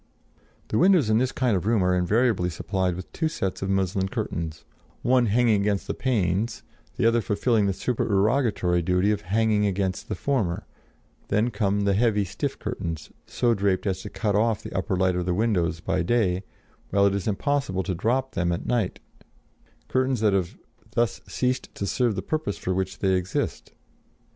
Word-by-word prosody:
The 110 - +1
windows 175 - +4
in 110 - +4
this 130 +1 +1
kind 125 -5 +1
of 95 +2 -2
room 110 -4 +3
are 90 0 +3
invariably 95 +1 +2
supplied 95 0 -1
with 90 0 -8
two 160 - 0
sets 95 - -3
of 95 - -2
muslin 95 0 0
curtains, 80 -4 -4 0.4
one 125 -1 +3
hanging 110 -1 +3
against 100 -1 0
the - - -2
panes, 110 -3 0 0.3
the - - 0
other 115 0 +4
fulfilling 105 0 +1
the - - +2
supererogatory 105 -4 +1
duty 90 +4 +2
of 105 -1 -1
hanging 105 +2 +2
against 95 -1 -2
the - - -1
former; 110 -12 -1 0.6
then 110 +4 +1
come 100 -1 0
the 100 0 +2
heavy 105 -1 +2
stuff - - -3
curtains, 80 -2 -5 0.2
so 120 -1 +1
draped 100 -2 0
as 95 -2 -1
to - - -7
cut 105 -3 -1
off 110 0 +1
the - - -8
upper 95 +1 0
light 95 0 +2
of 90 0 -2
the 90 - +1
windows 90 -6 0
by 95 - 0
day, 95 -1 +1 0.5
while 100 0 +3
it 100 - +3
is 100 +1 -2
impossible 110 -3 0
to 95 - -2
drop 125 +9 0
them 85 0 0
at 85 - -3
night: 115 -6 0 0.9
curtains 130 -1 +1
that 105 -2 +3
have 95 -3 -1 0.4
thus 120 0 0
ceased 130 0 -2
to 100 - -3
serve 120 +2 +1
the - - -3
purpose 155 -10 -2
for 95 - -2
which 95 0 -2
they 95 -1 +1
exist. 90 0 -2
100 Hz, 180 wpm, -25 LUFS, 95-115 Hz, 0.9 s, windows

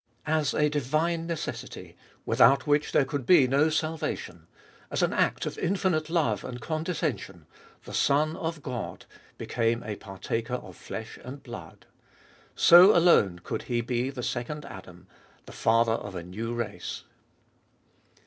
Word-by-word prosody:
As 155 -1 0
a 150 - +3
divine 155 +4 -1
necessity, 165 -2 -6 0.3
without 135 - +4
which 150 0 +1
there 140 - +3
could 140 0 -3
be 145 -1 +6
no 140 +5 +3
salvation, 155 0 -3 0.4
as - - 0
an - - +1
act - - +1
of - - -5
infinite 175 -4 0
love 145 - +1
and 125 -1 -6
condescen 155 - -2
sion, 90 -5 -12 0.4
the - - -10
Son 155 +3 +2
of 165 -3 -4
God 125 -4 -5 0.3
became 115 0 -1
a 105 -1 -4
partaker 115 +5 -4
of - - -8
flesh 110 0 -8
and 135 +3 -9
blood. 90 -10 -10 0.7
So 180 +5 +8
alone 100 - +4
could - - -3
He 120 -1 +1
be 125 +2 -1
the 130 -3 -6
Second 125 +5 -4
Adam, 95 -4 -11 0.4
the - - -11
Father 115 0 +2
of 105 -4 -5
a 85 - -5
new 105 +7 -5
race. 120 -3 -5
130 Hz, 150 wpm, -27 LUFS, 115-155 Hz, 0.7 s, So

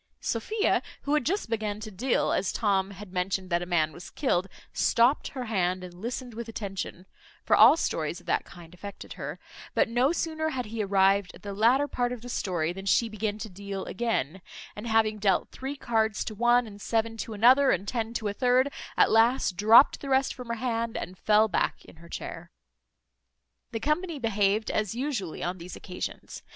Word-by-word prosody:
Sophia, 415 - 0 0.2
who 285 - -1
had 300 - +3
just 380 - -1
began 215 -2 -2
to 215 0 -7
deal 240 +7 0
as 190 - 0
Tom 195 -3 +1
had 200 -1 -11
mentioned 185 0 -2
that 170 0 +2
a 175 - -5
man 160 -3 +1
was 175 - -10
killed, 195 -10 0 0.3
stopt 240 +5 +3
her 250 - -3
hand, 185 -4 0
and 180 -1 -9
listened 240 +6 -5
with 230 +1 -6
attention 195 -4 -5 0.4
(for - - +4
all 245 +9 +8
stories 165 - -2
of 175 - -20
that - - +1
kind 170 -1 -14
affected 200 +3 -9
her), - - -6 0.4
but - - +3
no 245 +5 +2
sooner 315 -2 -1
had 260 -4 -3
he 220 +1 -4
arrived 195 -1 +3
at - - -16
the 200 -1 -5
latter 240 +8 +3
part 245 -3 -1
of 245 -2 -6
the 245 - -8
story 175 -7 -1
than 195 +1 -8
she 230 +4 +3
began 215 -1 -3
to 220 +1 -6
deal 200 0 -6
again; 190 - -2 0.3
and 210 +3 -6
having 220 -1 +2
dealt 195 -3 +1
three 270 +2 -5
cards 220 -5 0
to 220 - -4
one, 240 +3 +3
and 205 -2 -11
seven 225 +1 0
to 225 0 -5
another, 255 +6 +6
and 190 +3 0
ten 230 0 -2
to 225 -2 -3
a 200 - -2
third, 255 +4 +2 0.2
at - - +5
last 225 -2 +3
dropt 220 +8 +6
the 275 - -6
rest 265 0 +2
from 250 -2 -9
her 235 - -2
hand, 230 -1 -2
and 180 - -6
fell 215 +1 +4
back 200 - -1
in - - -16
her 170 +1 -15
chair. 170 +1 -7 1.2
The 225 - -3
company 310 +5 -1
behaved 215 -3 +1
as 215 0 -1
usually 245 - -3
on 180 +1 -3
these 175 +2 -8
occasions. 180 -2 -7
220 Hz, 200 wpm, -28 LUFS, 190-245 Hz, 1.2 s, all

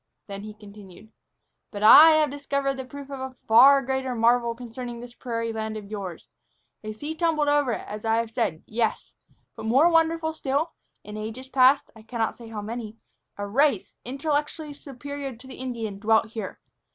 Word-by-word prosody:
Then 200 -1 -7
he 210 0 -9
continued. 205 0 -14 0.6
"But 205 -1 -6
I 310 +9 +10
have 305 -3 +2
discovered 280 -1 -1
the 265 -1 -6
proof 280 +2 -10
of 275 - -5
a 260 0 -6
far 270 +5 +7
greater 265 -1 -2
marvel 235 0 +2
concerning 240 0 -7
this 240 0 -10
prairie 230 -2 -4
land 220 0 -4
of 205 -1 -10
yours. 190 -5 -6 0.6
A 215 - -5
sea 290 +9 -5
tumbled 320 -2 +1
over 290 -4 +2
it, - - -5
as 210 0 -7
I 225 0 +2
have 230 0 -1
said; 220 -10 -2
yes, 225 0 -2 0.4
but, 220 - -6
more 270 +9 +5
wonderful 325 -1 +2
still, 300 +2 -1 0.3
in 210 +1 -8
ages 225 +5 -7
past 265 +1 +4
I 220 - -13
cannot 225 0 -2
say 235 - -12
how 215 -2 -6
many 225 0 -6 0.4
a 205 - -3
race, 250 +1 +1
intellectually 295 +3 -2
superior 280 -1 -7
to 245 +4 -15
the 260 - -10
Indian, 230 -6 -5
dwelt 220 +1 +2
here. 220 0 -6
240 Hz, 180 wpm, -25 LUFS, 220-280 Hz, 0.6 s, I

